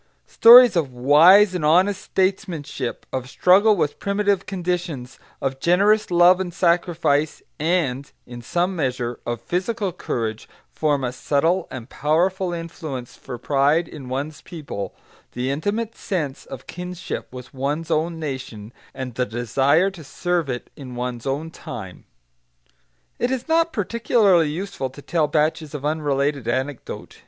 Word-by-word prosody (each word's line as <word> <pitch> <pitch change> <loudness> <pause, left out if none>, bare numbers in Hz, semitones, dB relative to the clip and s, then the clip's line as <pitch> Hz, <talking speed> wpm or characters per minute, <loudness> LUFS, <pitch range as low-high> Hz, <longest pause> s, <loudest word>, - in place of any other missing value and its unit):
Stories 240 -1 +8
of 155 -6 0
wise 165 +11 +6
and 180 -4 -3
honest 185 +6 +3
statesmanship, 175 - -2
of 130 -1 -3
struggle 195 +9 +4
with 155 -5 -1
primitive 200 -1 0
conditions, 175 -8 -4 0.2
of 135 -1 -3
generous 205 +7 +3
love 175 +1 +5
and 185 -2 -3
sacrifice, 170 -4 +1 0.2
and 150 -5 0
in 120 -1 -9
some 175 +9 -1
measure 125 -6 -2
of 120 -1 -2
physical 190 - -2
courage, 110 -6 -4 0.2
form 145 -3 0
a 125 - -1
subtle 160 +7 0
and 125 -3 -8
powerful 175 +7 0
influence 160 -7 -6
for 125 - -8
pride 145 +6 +2
in 135 -5 -10
one's 145 +4 -4
people, 140 - -7 0.4
the 125 +2 -2
intimate 205 +10 -2
sense 155 -9 -4
of - - -9
kinship 180 0 -6
with 125 +1 -10
one's 145 +5 -3
own 165 +2 0
nation, 130 -7 -6 0.2
and 130 -2 -5
the 125 +2 0
desire 135 - +2
to 175 -4 -12
serve 175 +1 -2
it 125 -1 -5
in 130 -3 -9
one's 125 0 -4
own 150 +4 -2
time. - - -9 1.1
It 245 - +1
is 260 +1 -3
not 330 +1 +2
particularly 205 - +2
useful 155 -5 -4
to 140 +3 -13
tell 160 -3 +1
batches 155 0 0
of 145 -1 -5
unrelated 145 -4 -1
anecdote. 130 +3 -4
155 Hz, 140 wpm, -22 LUFS, 135-180 Hz, 1.1 s, Stories